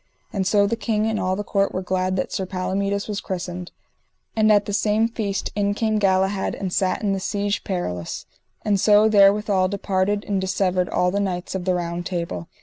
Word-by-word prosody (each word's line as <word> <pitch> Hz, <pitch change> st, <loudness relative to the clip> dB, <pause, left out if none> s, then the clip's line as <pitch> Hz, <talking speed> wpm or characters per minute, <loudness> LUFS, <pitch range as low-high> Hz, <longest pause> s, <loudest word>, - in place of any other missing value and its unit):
And 190 Hz, -2 st, 0 dB
so 205 Hz, 0 st, +4 dB
the 220 Hz, +3 st, 0 dB
king 220 Hz, -2 st, 0 dB
and 220 Hz, -1 st, 0 dB
all 185 Hz, 0 st, 0 dB
the 205 Hz, -, -3 dB
court 200 Hz, -1 st, 0 dB
were 185 Hz, -, -2 dB
glad 185 Hz, 0 st, 0 dB
that 185 Hz, -, -2 dB
Sir 190 Hz, -, -2 dB
Palomides 200 Hz, +2 st, -2 dB
was 205 Hz, -2 st, -3 dB
christened. 180 Hz, -1 st, -5 dB, 0.6 s
And 215 Hz, -1 st, +4 dB
at 205 Hz, -1 st, +4 dB
the 205 Hz, -, -4 dB
same 215 Hz, +2 st, +2 dB
feast 210 Hz, -4 st, -3 dB
in 205 Hz, 0 st, +1 dB
came 215 Hz, -1 st, +1 dB
Galahad 190 Hz, 0 st, +1 dB
and 190 Hz, -2 st, -4 dB
sat 190 Hz, +3 st, 0 dB
in 200 Hz, -2 st, +1 dB
the 195 Hz, -, -1 dB
Siege 205 Hz, +1 st, -1 dB
Perilous. 90 Hz, -, -4 dB, 0.4 s
And 205 Hz, -2 st, +2 dB
so 210 Hz, +2 st, +5 dB
therewithal 200 Hz, -2 st, +4 dB
departed 200 Hz, +1 st, -1 dB
and 195 Hz, -2 st, 0 dB
dissevered 185 Hz, -1 st, 0 dB
all 180 Hz, 0 st, +1 dB
the 200 Hz, -, 0 dB
knights 185 Hz, -3 st, -2 dB
of 190 Hz, -2 st, -3 dB
the 185 Hz, -1 st, +2 dB
Round 170 Hz, 0 st, -3 dB
Table. 170 Hz, -, -4 dB
195 Hz, 200 wpm, -23 LUFS, 185-205 Hz, 0.6 s, so